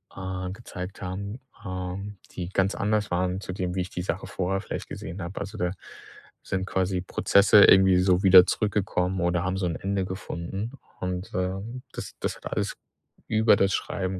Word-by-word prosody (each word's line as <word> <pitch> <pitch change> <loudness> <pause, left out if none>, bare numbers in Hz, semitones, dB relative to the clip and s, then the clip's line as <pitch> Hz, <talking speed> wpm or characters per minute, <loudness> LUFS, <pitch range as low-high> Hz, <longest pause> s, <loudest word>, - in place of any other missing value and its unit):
äh, 95 -1 -4
gezeigt 95 -3 -8
haben, 100 +5 -5 0.3
ähm, 95 +2 -5
die 90 -1 -5
ganz 95 +1 +1
anders 105 -1 0
waren 90 +1 0
zu 95 - -5
dem, 90 -1 -3
wie 95 - 0
ich 90 - -4
die 90 - -3
Sache 95 0 -3
vorher 95 +1 -1
vielleicht - - -5
gesehen 90 +4 -6
habe. 85 +3 -5
Also, 100 +2 -6
da 90 -3 0 0.7
sind 95 0 -2
quasi 95 -1 0
Prozesse 100 +2 +5
irgendwie 95 -1 +6
so 90 0 +3
wieder 95 -1 +9
zurückgekommen 95 -3 0
oder 85 0 +1
haben 95 +1 -1
so 95 - -1
'n 85 - -2
Ende 95 +1 -1
gefunden. 95 +4 -5 0.3
Und, 90 +1 -3
ähm, 95 +7 -3
das - - -7
das - - -2
hat - - -8
alles - - -1 0.5
über 110 0 +5
das 100 0 +2
Schreiben 95 -1 -2
95 Hz, 180 wpm, -26 LUFS, 90-100 Hz, 0.7 s, wieder